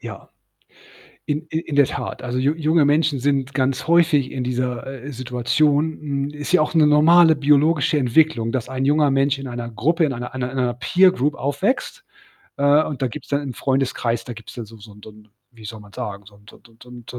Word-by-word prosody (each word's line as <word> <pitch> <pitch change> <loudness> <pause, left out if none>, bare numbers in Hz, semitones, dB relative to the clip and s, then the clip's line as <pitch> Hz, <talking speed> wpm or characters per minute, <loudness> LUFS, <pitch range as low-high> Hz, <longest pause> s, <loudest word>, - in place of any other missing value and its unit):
Ja, - - -10 1.0
in 155 +2 -3
i 160 - -1
in 160 -3 -6
der 140 -1 +5
Tat. - - -6
Also 125 0 -4
ju 140 +4 +1
junge 155 -1 +2
Menschen 145 -1 +1
sind 140 0 -1
ganz 135 +1 -1
häufig 160 -5 +3
in 130 -2 -4
dieser, 125 -1 -3 0.2
äh, 145 - -7
Situation, 140 +5 0
hm, 140 -1 -3
ist 145 +2 -7
ja 180 -3 +4
auch 155 - -1
'ne 155 - +5
normale 160 +2 +5
biologische 150 +2 +2
Entwicklung, 125 -3 +2
dass 125 -2 -3
ein 130 0 -2
junger 145 0 +3
Mensch 135 +1 +1
in 135 - -7
einer 120 -1 -6
Gruppe, 165 +10 0
in 140 - -2
einer 125 0 -7
einer 125 -1 -4
einer 125 -2 -1
Peer 180 +9 +3
Group 145 -1 -1
aufwächst, 190 - -2 0.5
äh, 145 +2 +4
und 135 -3 -6
da 130 - +1
gibt's 150 - -10
dann 140 0 -1
im 135 -3 -5
Freundeskreis 125 -4 -1
da 120 - -7
gibt's 115 0 -12
da 120 - -6
so 110 +1 -15
so 105 0 -14
'n 105 - -17
so - - -11
'n 105 0 -19 0.3
wie 110 - -14
soll 110 0 -8
man 105 -1 -16
sagen, 100 0 -6
so 100 - -16
'n 105 0 -24
so - - -15
'n - - -27 0.2
so 125 - -16
'n 120 -1 -12
so 125 - -8
'n - - -5
135 Hz, 230 wpm, -21 LUFS, 125-150 Hz, 1.0 s, der